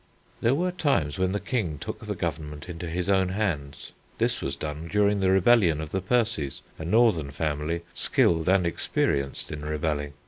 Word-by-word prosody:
There 120 +4 +3
were 180 +4 0
times 135 - 0
when 95 0 +2
the 100 - -1
King 100 - -2
took - - -6
the - - -4
government 75 -1 -4
into 85 -1 -6
his 90 +2 -2
own 95 -2 +3
hands. 90 -9 -3 0.3
This - - 0
was 70 0 -2
done 75 +3 -5
during 105 0 +3
the 95 -1 +2
rebellion 95 -4 +4
of 80 -1 -5
the 95 - -1
Percies, 105 - 0 0.2
a 80 - -5
northern 100 -7 +3
family 75 +3 -2
skilled 80 0 +2
and 95 -1 +4
experienced 70 -5 -1
in 75 - -5
rebelling. 75 -1 -2
85 Hz, 175 wpm, -26 LUFS, 75-100 Hz, 0.3 s, rebellion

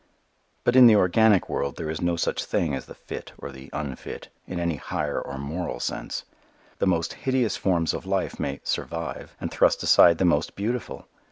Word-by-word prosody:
But 120 - +2
in 130 -1 +10
the 110 - +7
organic 105 +1 +4
world 70 - -2
there 80 -2 -4
is 80 - -5
no 85 -1 +1
such 85 - -1
thing 80 -4 0
as 65 - -4
the - - -11
"fit" - - -8
or - - -7
the 65 0 -12
"unfit," 70 -3 -6 0.2
in 90 - -4
any 85 -3 -1
higher - - -2
or 70 -1 -6
moral 80 +6 -4
sense. - - -4 0.5
The - - +2
most 85 -2 +1
hideous 130 -4 0
forms 85 -4 +1
of - - -6
life 95 -1 -1
may 70 0 -3
"survive" 85 0 -4
and - - -4
thrust - - +3
aside 85 -1 +7
the 95 - +2
most 85 -3 +1
beautiful. 115 +4 -4
85 Hz, 190 wpm, -25 LUFS, 75-100 Hz, 0.5 s, in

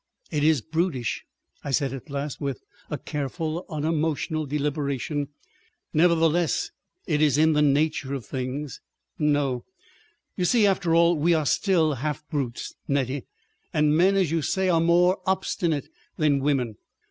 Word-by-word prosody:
"It 150 -3 0
IS 155 -4 +4
brutish," 160 -6 -2 0.4
I - - -5
said 135 -1 +1
at 135 0 -8
last, 140 +1 -4
with 140 -3 -3 0.3
a 150 - -2
careful 155 +5 -4
unemotional 155 -1 -1
deliberation. 145 0 -2 0.7
"Nevertheless—it 165 -2 +1
is 150 -2 +4
in 160 +1 +4
the 150 - +3
nature 145 -1 +1
of 130 -5 -6
things.... 130 +2 -4 0.4
No!... 145 -4 +1 0.7
You 180 - 0
see, 220 +3 +4
after 185 -4 +2
all, 170 +1 +5
we 165 +3 +3
are 155 -2 0
still 160 +3 +2
half 150 +2 -4
brutes, 135 -6 -3
Nettie. 135 -1 -1 0.5
And 150 0 +3
men, 185 +4 +4
as 185 -5 +2
you 165 -1 +1
say, 190 +5 0
are 165 -2 +3
more 175 +3 +4
obstinate 170 -5 0 0.3
than 150 -3 +3
women. 130 -6 0
150 Hz, 140 wpm, -25 LUFS, 140-165 Hz, 0.7 s, all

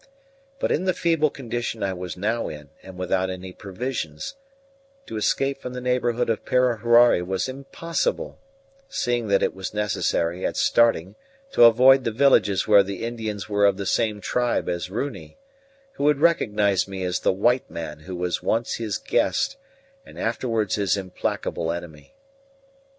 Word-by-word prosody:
But - - -1
in 180 - 0
the 185 -2 +1
feeble 165 -4 +2
condition 120 -4 -4
I 95 -1 0
was 90 -2 -6
now 110 +5 -1
in, 75 -2 -10
and 95 -1 -12
without 95 +1 0
any 95 0 -7
provisions, 95 - -5 0.7
to - - -7
escape 135 +5 0
from 125 - -6
the 125 - -4
neighbourhood 125 -1 0
of 115 -1 -1
Parahuari 120 -4 +4
was 95 +5 -2
impossible, 165 - -3 0.5
seeing 120 - -1
that 100 -1 +2
it - - +1
was 95 +1 -6
necessary 95 -4 -1
at - - -2
starting 110 -6 +3 0.4
to 120 - +6
avoid 130 +3 +6
the - - 0
villages 110 -5 +3
where 105 -2 +7
the 100 0 -5
Indians 110 -3 -4
were 100 -1 +3
of 100 -1 +1
the 100 - -4
same 105 +2 0
tribe 120 +5 0
as 85 0 -3
Runi, 135 - -5 0.5
who 145 - -3
would 150 -1 +3
recognize 105 - +2
me 95 -1 -5
as 90 0 -1
the - - +2
white 120 +7 +1
man 75 -2 -6
who 90 +4 -8
was 90 0 -2
once 115 +1 -1
his 110 -4 -2
guest 275 - 0 0.5
and - - -15
afterwards 115 -3 -1
his 100 -2 +1
implacable 90 -3 -3
enemy. 85 - -8
110 Hz, 160 wpm, -24 LUFS, 95-125 Hz, 0.7 s, where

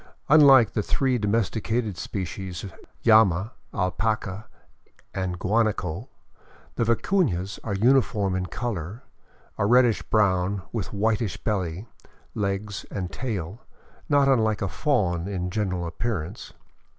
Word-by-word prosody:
Unlike 135 -5 +7
the 105 - 0
three 130 +3 0
domesticated 110 +1 0
species, 95 0 -5 0.4
llama, 110 -2 +5 0.2
alpaca, 100 +2 -2 0.7
and 95 -1 -2
guanaco, 105 -1 -1 0.6
the - - 0
vicunas 115 - 0
are 105 -3 -2
uniform 110 -4 +2
in 90 -1 -2
color, 105 0 -4 0.6
a 100 - +2
reddish 120 -1 +4
brown 100 -2 +1
with 110 -6 -4
whitish 110 0 0
belly, 95 -3 -2 0.5
legs, 100 0 -3
and 95 -3 -4
tail, 110 -4 -4 0.5
not 145 -2 +4
unlike 110 -6 +2
a - - 0
fawn 95 - 0
in 90 -2 -3
general 95 -4 -1
appearance. 90 +1 -4
105 Hz, 110 wpm, -25 LUFS, 95-115 Hz, 0.7 s, Unlike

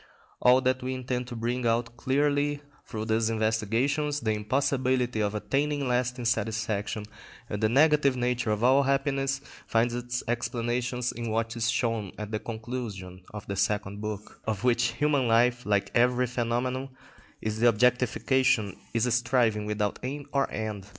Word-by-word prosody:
All 125 +1 +6
that 130 0 +1
we 130 +1 -3
intend 125 -1 -3
to 125 - -6
bring 120 +2 -1
out 115 +1 0
clearly 145 +2 +1 0.2
through 110 -2 -4
these 110 0 +1
investigations, 115 +7 0
the 110 - 0
impossibility 125 +2 0
of 105 0 0
attaining 140 +5 0
lasting 125 0 0
satisfaction 110 -2 -1 0.4
and 105 -2 -4
the 110 - +3
negative 145 +1 +4
nature 120 -2 0
of 105 +1 0
all 130 +3 +6
happiness, 135 0 0 0.3
finds 115 +1 +2
its 120 0 -3
explanation 120 +1 -1
in 120 0 -4
what 115 +1 -1
is 115 0 0
shown 115 -4 -1
at 105 0 -6
the 110 - -1
conclusion 110 -6 -6
of 105 -1 -8
the 100 - -4
Second 100 +1 -1
Book: 105 -1 -4
that - - -21
the - - -17
will, - - +2
of 105 +1 -9
which 120 -1 +3
human 140 -1 +1
life, 120 +1 +3
like 100 -2 +1
every 125 +1 +3
phenomenon, 125 +2 -2 0.5
is 110 0 -3
the 120 - +5
objectification, 125 -2 +2 0.2
is 115 +1 +3
a 125 - 0
striving 120 -3 +2
without 105 -1 -1
aim 140 +3 -5
or 140 -1 +2
end. 105 -3 -4
120 Hz, 165 wpm, -28 LUFS, 110-130 Hz, 0.5 s, All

